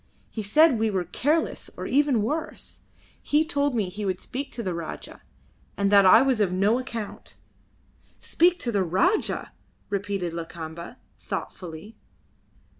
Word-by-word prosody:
He 220 Hz, -, -4 dB
said 260 Hz, +5 st, +4 dB
we 220 Hz, 0 st, +2 dB
were 190 Hz, -3 st, 0 dB
careless 295 Hz, -, -1 dB
or -, -, -5 dB
even 275 Hz, -5 st, +2 dB
worse. 305 Hz, +8 st, -4 dB, 0.4 s
He 300 Hz, +2 st, +2 dB
told 285 Hz, -4 st, 0 dB
me 210 Hz, -5 st, 0 dB
he 200 Hz, +4 st, -6 dB
would 190 Hz, -2 st, -1 dB
speak 275 Hz, +3 st, -5 dB
to 235 Hz, -, -4 dB
the 185 Hz, -3 st, -2 dB
Rajah, 165 Hz, -1 st, -7 dB, 0.6 s
and 200 Hz, 0 st, +1 dB
that 200 Hz, -2 st, +7 dB
I 225 Hz, +6 st, +8 dB
was 260 Hz, -5 st, +2 dB
of 195 Hz, -3 st, +2 dB
no 200 Hz, +6 st, +2 dB
account." 230 Hz, -5 st, -7 dB, 0.8 s
"Speak 350 Hz, +1 st, +3 dB
to 240 Hz, -, -1 dB
the 200 Hz, -3 st, +1 dB
Rajah!" 280 Hz, -, +1 dB, 0.4 s
repeated 200 Hz, -4 st, -2 dB
Lakamba, 165 Hz, 0 st, -7 dB, 0.2 s
thoughtfully. 180 Hz, +5 st, -7 dB
215 Hz, 145 wpm, -25 LUFS, 185-270 Hz, 0.8 s, I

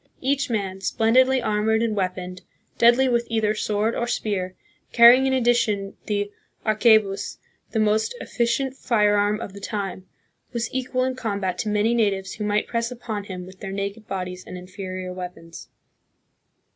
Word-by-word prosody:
Each 280 Hz, +1 st, 0 dB
man, 195 Hz, -4 st, -2 dB
splendidly 255 Hz, +5 st, +3 dB
armored 220 Hz, +1 st, +1 dB
and 225 Hz, -2 st, 0 dB
weaponed, 185 Hz, -1 st, -3 dB, 0.4 s
deadly 240 Hz, +3 st, +6 dB
with 235 Hz, -1 st, +1 dB
either 220 Hz, -2 st, +1 dB
sword 215 Hz, +1 st, 0 dB
or 235 Hz, -, -2 dB
spear, 195 Hz, -6 st, -2 dB, 0.4 s
carrying 245 Hz, +3 st, +8 dB
in 265 Hz, -, +1 dB
addition 235 Hz, -5 st, +1 dB
the 205 Hz, -1 st, -1 dB, 0.3 s
arquebus, 215 Hz, -2 st, +3 dB, 0.3 s
the 220 Hz, -, -1 dB
most 215 Hz, -, +1 dB
efficient 255 Hz, +3 st, -1 dB
firearm 210 Hz, -3 st, +2 dB
of 205 Hz, -4 st, -7 dB
the 200 Hz, -, -9 dB
time, 195 Hz, -2 st, -4 dB, 0.5 s
was 235 Hz, -1 st, -3 dB
equal 255 Hz, 0 st, -1 dB
in 260 Hz, 0 st, 0 dB
combat 200 Hz, -7 st, -2 dB
to 215 Hz, -, -1 dB
many 210 Hz, +2 st, +2 dB
natives 195 Hz, -5 st, 0 dB
who 215 Hz, -, -5 dB
might 210 Hz, 0 st, +1 dB
press 230 Hz, 0 st, -2 dB
upon 225 Hz, -4 st, -5 dB
him 185 Hz, -2 st, -7 dB
with 185 Hz, 0 st, -14 dB
their 195 Hz, -2 st, -6 dB
naked 200 Hz, +2 st, -4 dB
bodies 180 Hz, -1 st, -4 dB
and 180 Hz, -, -8 dB
inferior 185 Hz, 0 st, -6 dB
weapons. 180 Hz, -2 st, -9 dB
210 Hz, 155 wpm, -24 LUFS, 195-235 Hz, 0.5 s, carrying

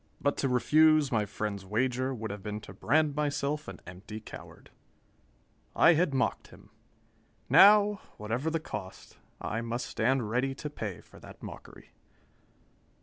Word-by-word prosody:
But 145 Hz, -, +1 dB
to 135 Hz, -, 0 dB
refuse 155 Hz, +3 st, +4 dB
my 110 Hz, -3 st, +1 dB
friend's 100 Hz, -1 st, -4 dB
wager 125 Hz, +6 st, -1 dB
would 110 Hz, -4 st, -5 dB
have 100 Hz, -1 st, -7 dB
been 105 Hz, +2 st, -5 dB
to -, -, -11 dB
brand 155 Hz, 0 st, +1 dB
myself 150 Hz, 0 st, -1 dB
an -, -, -8 dB
empty 95 Hz, +5 st, -9 dB
coward. 110 Hz, -, -12 dB, 1.0 s
I 165 Hz, -, +6 dB
had 165 Hz, 0 st, +2 dB
mocked 130 Hz, -2 st, -1 dB
him. -, -, -18 dB, 0.8 s
Now, 205 Hz, +7 st, +6 dB, 0.2 s
whatever 115 Hz, +8 st, -2 dB
the 165 Hz, 0 st, -1 dB
cost, 95 Hz, -11 st, -9 dB, 0.2 s
I 115 Hz, +2 st, -3 dB
must 115 Hz, +1 st, -3 dB
stand 125 Hz, 0 st, 0 dB
ready 130 Hz, +4 st, -1 dB
to 150 Hz, +1 st, -6 dB
pay 105 Hz, -10 st, -6 dB
for -, -, -17 dB
that -, -, -14 dB
mockery. -, -, -11 dB
130 Hz, 145 wpm, -29 LUFS, 105-150 Hz, 1.0 s, I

